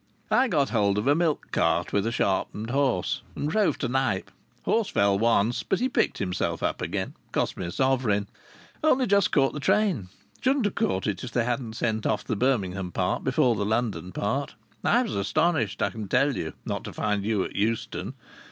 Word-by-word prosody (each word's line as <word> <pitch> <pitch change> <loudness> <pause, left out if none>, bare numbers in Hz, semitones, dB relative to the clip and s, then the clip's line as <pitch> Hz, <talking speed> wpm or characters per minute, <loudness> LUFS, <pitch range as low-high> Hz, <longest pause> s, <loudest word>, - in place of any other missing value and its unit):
"I 260 +1 +4
got 145 - +1
hold 100 -3 +2
of 105 - 0
a 140 - +5
milk 160 -1 0
cart - - +1
with 100 +2 +1
a - - 0
sharpened 105 +1 -1
horse, 130 -9 +1
and 145 - -2
drove 205 +6 +2
to 130 - -2
Knype. 125 -6 0 0.3
Horse 225 -3 +1
fell 100 -1 +2
once, 115 0 +2
but 190 - -1
he 255 - +1
picked - - +1
himself 90 -2 -2
up - - -1
again. - - -3 0.2
Cost - - 0
me 90 - -4
a - - -5
sovereign. 125 -5 +1 0.6
Only 270 -4 +4
just 200 -1 +3
caught 135 - +3
the 150 - -4
train. 145 - +1 0.3
Shouldn't 265 -2 +2
have 205 - 0
caught 95 0 0
it 100 -4 -2
if 125 - -4
they 120 -1 0
hadn't 120 -2 -2
sent 110 -1 -1
off 105 - 0
the - - -2
Birmingham 95 -7 0
part - - -1
before 125 - +3
the 105 - -1
London 105 -5 -1
part. 120 +10 -2 0.3
I 245 - +4
was 230 - -4
astonished, 110 - +1
I 100 - +1
can 110 0 -6
tell 135 +5 +2
you, 80 - -4
not - - -3
to - - -7
find 105 -2 -1
you 105 -2 +1
at - - -7
Euston. 110 +3 -2
115 Hz, 200 wpm, -26 LUFS, 100-145 Hz, 0.6 s, a